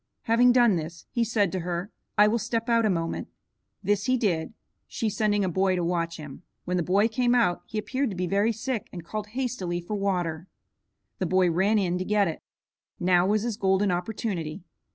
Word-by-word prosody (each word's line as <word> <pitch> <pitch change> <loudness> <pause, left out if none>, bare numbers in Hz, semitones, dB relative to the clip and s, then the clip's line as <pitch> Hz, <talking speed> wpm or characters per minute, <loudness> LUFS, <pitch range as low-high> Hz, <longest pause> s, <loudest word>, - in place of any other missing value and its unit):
Having 240 +2 +5
done 240 -6 +5
this, 165 +1 -7
he 235 - +1
said 210 -5 +1
to 185 - -2
her, 175 +4 -3 0.3
"I 210 0 +7
will 230 +2 +1
step 230 +1 -2
out 230 -1 +4
a - - +1
moment." 165 -3 -2 0.6
This 200 +1 +1
he 255 0 +2
did, 180 -8 0 0.4
she 220 -2 -2
sending 205 -1 +1
a - - 0
boy 190 +1 +1
to 175 - -1
watch 170 -1 -1
him. 150 -2 -9 0.2
When 180 - -1
the - - +1
boy 195 +6 +3
came 245 +2 +1
out 220 -8 +2
he 220 - -5
appeared 260 +5 -1
to 195 - -5
be 180 +1 -1
very 200 +5 +2
sick 230 0 -3
and 175 -3 -8
called 210 +3 -4
hastily 210 -10 -2
for 175 +5 -6
water. 180 -4 -1 0.7
The 185 - 0
boy 185 0 +3
ran 195 +6 +2
in 180 -3 0
to - - -1
get 205 0 +2
it. 160 - -4 0.6
Now 180 0 +3
was 210 +1 +2
his 230 -3 -2
golden 190 0 +2
opportunity. 175 -4 -3
195 Hz, 205 wpm, -26 LUFS, 175-220 Hz, 0.7 s, I